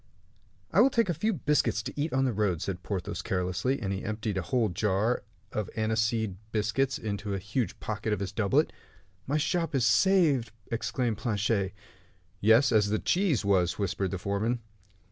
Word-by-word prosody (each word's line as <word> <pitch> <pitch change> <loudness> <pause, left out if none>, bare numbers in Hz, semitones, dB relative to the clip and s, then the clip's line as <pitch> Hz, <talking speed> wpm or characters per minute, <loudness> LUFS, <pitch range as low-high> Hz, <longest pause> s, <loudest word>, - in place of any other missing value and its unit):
"I - - +6
will 270 - +6
take 230 -6 +1
a - - +2
few 215 +8 0
biscuits 145 - +1
to - - -5
eat 150 +3 -1
on 135 0 +2
the 125 - +1
road," 100 -5 0
said 95 0 -4
Porthos, 95 -3 -3
carelessly; 90 +8 -1
and 100 -3 -2
he 95 - -4
emptied 110 -1 -3
a 95 - 0
whole 120 +1 +1
jar 105 +5 +1 0.3
of 105 -3 -3
aniseed 110 -2 0
biscuits 110 +6 0
into 105 -1 -4
the 100 - -1
huge 105 +6 -2
pocket 110 0 -3
of 105 - 0
his 100 -1 -3
doublet. 100 -2 +1 0.5
"My 145 +3 +1
shop 165 0 0
is 125 -3 +2
saved!" 135 - +3 0.2
exclaimed 115 -1 -1
Planchet. 105 -3 0 0.6
"Yes, 115 +7 +5
as 105 -2 +4
the 110 - +1
cheese 170 - +1
was," 95 -4 +2
whispered 100 -1 -1
the 95 - -3
foreman. 100 +6 -1
110 Hz, 175 wpm, -29 LUFS, 100-130 Hz, 0.6 s, I